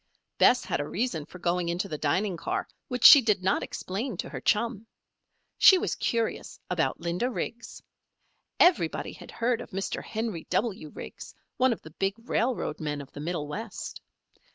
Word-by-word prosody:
Bess 250 0 +5
had - - -1
a 145 - -2
reason 185 -8 -2
for - - -11
going 175 -1 0
into 175 +3 -1
the 155 - -4
dining 185 +6 0
car 170 - -3 0.2
which 250 -2 -4
she 285 - +11
did 210 -5 +1
not 190 - +2
explain 205 +3 -4
to - - -4
her - - -6
chum. 225 0 0 0.7
She 380 - +9
was - - -1
curious 230 -1 -2
about - - 0
Linda 175 +8 -1
Riggs. 240 -1 -6 0.8
Everybody 355 0 +3
had - - -12
heard 235 0 0
of - - -9
Mr. 195 +1 -3
Henry 220 -7 -4
W. 200 -9 -1
Riggs, - - -10 0.2
one 260 0 +4
of 225 - -4
the 160 - -11
big 195 +5 -1
railroad 235 -9 -1
men 150 -2 -3
of 140 -2 -10
the - - -9
Middle 155 -1 -3
West. 220 +9 -6
195 Hz, 175 wpm, -28 LUFS, 170-235 Hz, 0.8 s, she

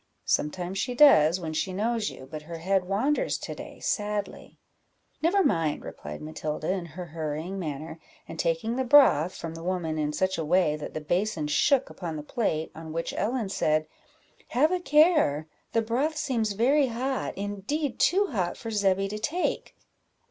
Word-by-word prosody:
"Sometimes 180 +5 -1
she 245 +4 -2
does, 185 - +6
when 160 -3 -4
she 185 +4 -1
knows 220 +3 0
you; 130 - -11
but 155 +3 -7
her 165 +2 -8
head 185 +2 +1
wanders 225 +11 0
to - - -6
day - - -10
sadly." 210 -1 -3 0.6
"Never 380 +5 +3
mind," 165 - +1
replied 75 +1 -8
Matilda, 155 +1 -3
in 185 -3 -3
her 175 +3 -7
hurrying 160 +3 -4
manner, 155 0 -5 0.3
and 160 - -8
taking 170 +9 0
the 260 - +1
broth 245 - +5
from 165 -1 -6
the 165 - -8
woman 170 -3 -2
in 150 -1 0
such 190 +3 0
a - - -1
way 165 -1 +3
that 150 - -7
the 155 - -3
basin 175 +1 -1
shook 260 - +2
upon 170 -4 -5
the 150 - -5
plate; 160 -3 -1
on 160 0 -9
which 165 0 -3
Ellen 225 -1 -1
said 155 -4 +1 0.6
"Have 300 +7 +2
a 365 - +1
care, 300 - +4 0.2
the 230 - +2
broth 270 +8 0
seems 230 -8 0
very 265 +7 +3
hot; 255 +3 -3
indeed, 205 +9 -3
too 395 +3 +4
hot 185 -7 -1
for 225 - -6
Zebby 195 -2 +2
to 210 +2 -5
take." 320 +11 -2
190 Hz, 175 wpm, -27 LUFS, 160-240 Hz, 0.6 s, does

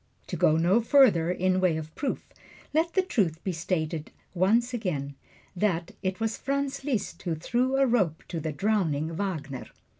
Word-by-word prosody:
To - - -2
go 155 - +4
no 180 +8 +4
further 225 - +5
in 185 +1 +1
way 175 -4 +3
of 155 0 -7
proof, 280 - -3 0.5
let 325 +2 +2
the 380 - +3
truth 195 - 0
be 190 - -1
stated 165 -2 -2
yet - - -24
once 225 +7 +2
again, 155 - -2 0.4
that 175 -3 0
it 185 +1 -2
was 225 0 -1
Franz 275 0 -2
Liszt 250 -8 -2
who 170 -3 -2
threw 245 - 0
a 275 - +5
rope 195 - +1
to 170 - -3
the 155 0 -3
drowning 165 -4 0
Wagner. 160 -8 -4
185 Hz, 175 wpm, -27 LUFS, 160-235 Hz, 0.5 s, further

